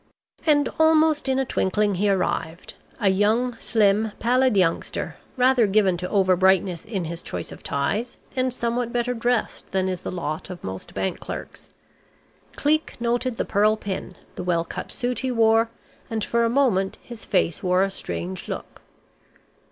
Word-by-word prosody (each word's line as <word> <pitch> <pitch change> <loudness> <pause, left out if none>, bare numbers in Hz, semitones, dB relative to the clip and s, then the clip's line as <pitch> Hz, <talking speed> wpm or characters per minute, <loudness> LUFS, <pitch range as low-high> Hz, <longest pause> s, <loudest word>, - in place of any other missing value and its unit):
And 290 -2 +4
almost 315 -2 +4
in 265 - +2
a 270 - +1
twinkling 205 -2 +1
he 200 +3 +1
arrived 180 -3 -1 0.3
a 205 -4 +3
young, 220 +6 +2
slim, 215 -1 +2
pallid 250 -1 +2
youngster, 175 -3 0 0.2
rather 250 -3 +4
given 195 -2 +3
to 180 +1 -4
over 190 -3 +3
brightness 185 -2 +2
in 200 -5 -3
his 170 +1 -5
choice - - -5
of - - -10
ties, 205 - -2 0.2
and 255 0 +1
somewhat 235 0 -1
better 245 +1 0
dressed 240 0 -1
than 190 -1 0
is 185 -1 -3
the - - -5
lot 160 -3 -4
of 180 -2 -8
most 95 0 -7
bank 190 - -2
clerks. - - -8 0.9
Cleek 310 -1 0
noted 240 +1 0
the - - -1
pearl 215 +1 +3
pin, 190 -3 -5 0.2
the - - -6
well 170 -2 +1
cut - - -6
suit 245 -1 -2
he 260 - -2
wore, 225 -1 +3 0.4
and 220 -2 -2
for 235 0 +2
a - - +2
moment 230 -7 +2
his 235 -3 -9
face 165 - 0
wore 180 +1 +3
a 195 - 0
strange 185 -1 -5
look. - - -7
215 Hz, 165 wpm, -24 LUFS, 185-245 Hz, 0.9 s, And